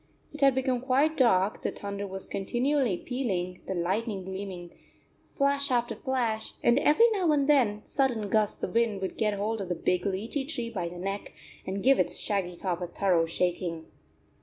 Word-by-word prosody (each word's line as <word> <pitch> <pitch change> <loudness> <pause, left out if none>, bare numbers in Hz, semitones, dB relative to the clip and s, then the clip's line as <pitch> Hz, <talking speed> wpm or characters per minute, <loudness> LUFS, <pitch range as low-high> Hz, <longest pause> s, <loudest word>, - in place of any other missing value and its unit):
It 300 - -8
had 275 -2 +5
become 260 -2 0
quite 275 +5 +2
dark, 210 -7 +3
the - - -1
thunder 200 0 -5
was 190 0 -7
continually 245 +1 0
pealing, 185 -9 -3
the 190 - -2
lightning 190 +3 -1
gleaming 190 -2 -6 0.6
flash 280 0 +1
after 240 -2 0
flash, 235 -2 -1
and 240 +3 +5
every 300 +10 +5
now 375 -7 +2
and 285 -2 +2
then 235 -8 +3
sudden 245 -7 0
gusts 210 +1 0
of 180 - -2
wind 230 -3 +2
would 190 - -3
get 210 -2 +1
hold 215 +2 -2
of 190 - -5
the 175 - 0
big 180 +2 0
lichi 220 +9 -2
tree 240 -7 -3
by 180 -6 -3
the 175 - -9
neck 195 +3 -4 0.3
and 190 +1 -3
give 270 +1 +5
its - - 0
shaggy 190 -4 -2
top 180 0 -3
a 175 - -2
thorough 175 -2 +1
shaking. 170 -1 -1
210 Hz, 185 wpm, -28 LUFS, 185-260 Hz, 0.6 s, had